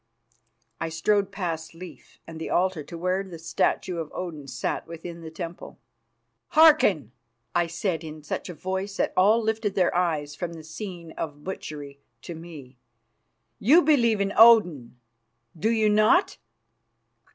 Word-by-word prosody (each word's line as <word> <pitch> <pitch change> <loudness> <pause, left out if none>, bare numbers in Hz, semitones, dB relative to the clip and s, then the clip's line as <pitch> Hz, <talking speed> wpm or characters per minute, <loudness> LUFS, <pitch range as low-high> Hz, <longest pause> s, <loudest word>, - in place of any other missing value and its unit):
I 165 - -2
strode 195 +5 +1
past 165 -4 -4
Leif 180 +1 -12
and 160 -1 -9
the - - -4
altar 185 -2 +1
to 165 +4 -9
where 185 +3 0
the 185 -4 -10
statue 165 +2 -1
of 160 -2 -5
Odin 160 -6 -6
sat 125 -3 -3
within 170 +1 -8
the 160 - -8
temple. 170 +1 -8 0.8
"Hearken!" 250 - +5 0.4
I 175 -1 +2
said 170 -1 -2
in 155 -1 -9
such 145 - -5
a 175 - -7
voice 190 +3 -4
that - - 0
all 215 +5 +4
lifted 220 -2 -1
their 185 -2 +2
eyes 155 -5 0
from 170 +1 -5
the 160 -1 -10
scene 170 0 -8
of 145 -2 -5
butchery 145 -6 -7 0.2
to 170 - -7
me. 155 -6 -11 0.8
"You 305 - +5
believe 240 -8 +3
in 200 0 -1
Odin, 180 - +5 0.6
do 190 +7 0
you 220 -2 +2
not?" 215 - +3
175 Hz, 150 wpm, -25 LUFS, 160-200 Hz, 0.8 s, Hearken